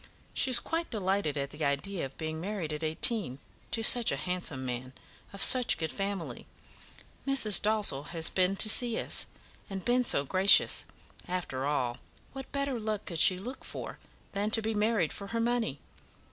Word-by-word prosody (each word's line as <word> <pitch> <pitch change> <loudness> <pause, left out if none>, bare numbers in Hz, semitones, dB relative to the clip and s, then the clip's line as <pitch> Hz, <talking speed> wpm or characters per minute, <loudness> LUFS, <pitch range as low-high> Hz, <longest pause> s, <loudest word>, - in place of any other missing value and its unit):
She 265 - +3
is 250 - +8
quite 330 +1 -4
delighted 190 -7 -2
at 140 0 -4
the 150 +1 -7
idea 145 +7 -2
of 135 - -12
being 160 0 -6
married 185 -5 -5
at 150 - -6
eighteen, 160 - +1 0.3
to 225 - -2
such 235 +1 +6
a 140 - -3
handsome 165 -5 -4
man, 125 +1 -6 0.4
of 200 - +1
such 255 -2 +4
a - - -16
good 160 -1 -4
family. 195 -3 -6 0.8
Mrs. 265 -7 +5
Dalzell 205 -10 0
has 165 -1 0
been 185 +1 0
to 205 - +6
see 235 +1 +4
us, - - 0 0.4
and 190 -2 -7
been 250 +1 +1
so 140 - +3
gracious. 190 +7 +4 0.4
After 175 -7 -4
all, 125 -5 -2 0.4
what 270 -1 -10
better 280 -3 -3
luck 215 -1 -4
could 170 -4 -5
she 185 +3 +6
look 245 +8 -9
for - - -9 0.3
than 205 +1 -3
to 225 +1 +2
be 220 +1 -2
married 210 -5 -1
for 200 - -9
her 230 +3 -4
money? 230 - -2
195 Hz, 180 wpm, -28 LUFS, 155-225 Hz, 0.8 s, is